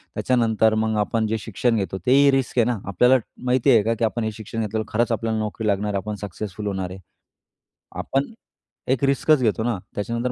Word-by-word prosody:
त्याच्यानंतर 110 -3 +2
मग 110 0 0
आपण 110 +1 0
जे 110 +1 -1
शिक्षण 115 +3 0
घेतो 95 -2 -2
तेही 140 +2 +5
रिस्क 135 -2 -1
आहे 115 - +4
ना. 120 -2 -1
आपल्याला 125 +7 +4 0.3
माहिती 130 +1 +2
आहे 115 -4 +5
का, 115 +2 +1
की 115 - 0
आपण 115 +1 -2
हे 110 - -1
शिक्षण 110 +1 -6
घेतल्यावर 110 0 -2
खरंच 120 +2 +1
आपल्याला 115 -1 -1
नोकरी 110 +1 -3
लागणार 105 0 0
आहे, - - 0
आपण 105 +2 -4
सक्सेसफुल 105 +1 -6
होणार 95 -2 -3
आहे. 95 - -8 1.0
आपण 135 +11 -1 0.6
एक 130 0 0
रिस्कच 140 +2 +3
घेतो 110 -2 +1
ना, 120 -2 0 0.2
त्याच्यानंतर 115 +4 -2
110 Hz, 200 wpm, -23 LUFS, 105-120 Hz, 1.0 s, तेही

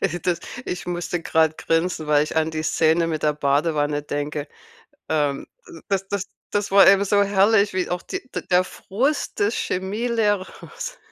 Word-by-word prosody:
Äh, 175 -3 -1
das 175 -2 -1 0.2
ich 180 - -5
musste 175 -1 -3
grad 160 -1 +2
grinsen, 165 -1 0
weil 150 0 +3
ich 155 - -7
an 160 0 +2
die 155 0 -3
Szene 165 +1 +2
mit 155 -2 -3
der 150 - +3
Badewanne 145 0 0
denke, 145 0 -4 0.6
ähm, 145 -3 0 0.4
das 195 -1 -1
das 200 -1 -3 0.3
das 205 -1 0
war 195 0 +7
eben 195 +1 +6
so 200 +1 +3
herrlich, 200 +1 +3
wie 185 -1 -1
auch 180 0 -2
die 385 - -5
d - - -2
der 180 0 +4
Frust 260 +11 -2
des 205 +3 +2
Chemielehrers 210 - -2
180 Hz, 165 wpm, -23 LUFS, 155-200 Hz, 0.6 s, war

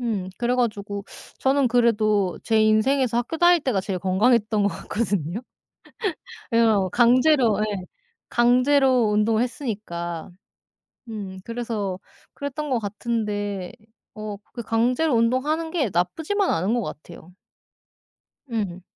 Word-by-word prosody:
음, 205 -6 -2
그래 245 +1 +1
가지고 205 -5 -2 0.3
저는 270 0 +2
그래도 215 -5 +2
제 220 -1 +3
인생에서 235 +3 +2
학교 245 +7 -1
다닐 350 0 +5
때가 250 -9 0
제일 185 -1 -3
건강했던 215 +3 +2
것 200 - +3
같거든요. 200 -3 -2 1.1
왜 230 - +3 0.3
강제로 245 -2 +4
예, 205 -4 -2 0.4
강제로 250 0 +3
운동을 215 +2 +2
했으니까. 195 - -4 0.8
음 200 -4 -6
그래서 225 -5 -3 0.3
그랬던 285 +1 -5
것 250 - +2
같은데 205 -3 -3 0.4
어 215 -1 -6 0.2
그 235 - -5
강제로 245 +7 +1
운동하는 270 +8 +1
게 285 - 0
나쁘지만은 320 - 0
않은 190 +8 0
것 240 - 0
같아요. 175 -1 -9 1.2
음. 195 -6 -3
225 Hz, 255 characters per minute, -24 LUFS, 200-250 Hz, 1.2 s, 다닐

